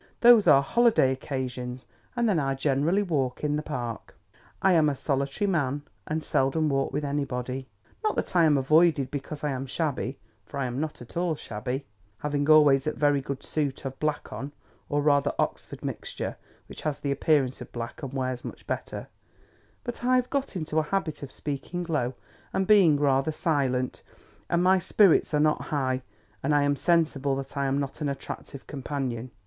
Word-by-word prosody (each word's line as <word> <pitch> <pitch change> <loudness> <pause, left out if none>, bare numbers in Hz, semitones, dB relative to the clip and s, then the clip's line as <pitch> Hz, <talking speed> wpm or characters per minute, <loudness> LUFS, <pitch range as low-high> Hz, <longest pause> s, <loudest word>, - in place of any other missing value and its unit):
Those 235 -5 +7
are 140 -3 +7
holiday 230 - +4
occasions, 130 -2 -4 0.3
and 240 -1 +2
then 195 -7 +3
I 135 -2 0
generally 145 +8 +1
walk 140 -9 -1
in 150 0 +1
the 150 - -1
Park. 120 -7 -5 0.4
I 190 - +4
am 155 -3 +5
a 140 - -1
solitary 140 +8 -1
man, 145 -6 0 0.2
and 155 +1 -2
seldom 150 +4 +1
walk 135 -1 0
with 150 - -2
anybody. 130 -2 -3 0.4
Not 430 - +1
that - - -2
I 170 -2 +6
am 150 -2 +4
avoided 150 0 +3
because 145 +1 -5
I 150 - 0
am 135 0 -4
shabby; 140 -2 -2 0.3
for 140 - -9
I 135 - 0
am 125 +1 -3
not 155 -4 -4
at 120 - -16
all 170 -2 0
shabby, 125 +2 -4 0.3
having 145 +3 -1
always 150 -3 +6
a 155 - +1
very 145 -2 +2
good 135 0 -5
suit 145 -3 -2
of 135 0 -5
black 150 -1 -2
on 140 +2 -6 0.4
(or 145 0 +1
rather 145 -1 +3
Oxford - - -3
mixture, - - -4 0.3
which - - -9
has 150 -2 -2
the 140 - -2
appearance 140 -2 +1
of - - -9
black 120 +3 -6
and 135 -3 -5
wears 130 -2 -2
much - - -8
better); - - -4 0.8
but 240 -1 -6
I 255 +1 +4
have 250 0 +1
got 275 -6 -1
into 160 -2 -1
a - - +3
habit 155 -1 -2
of 140 - -7
speaking 150 +5 -4
low, 130 -6 -1 0.4
and 190 - +1
being 185 -8 +6
rather 135 +1 +2
silent, 135 -5 0 0.5
and 170 +1 +2
my 190 +1 +5
spirits 190 0 +4
are - - +3
not 155 0 +2
high, 130 -3 -1 0.4
and 145 +2 +1
I 145 - +4
am 145 0 +2
sensible 145 -4 +2
that 135 +1 -6
I 140 -1 0
am 135 +1 +1
not 140 +2 -4
an 145 - 0
attractive 140 0 -7
companion. 130 -4 -4
145 Hz, 185 wpm, -27 LUFS, 135-155 Hz, 0.8 s, Those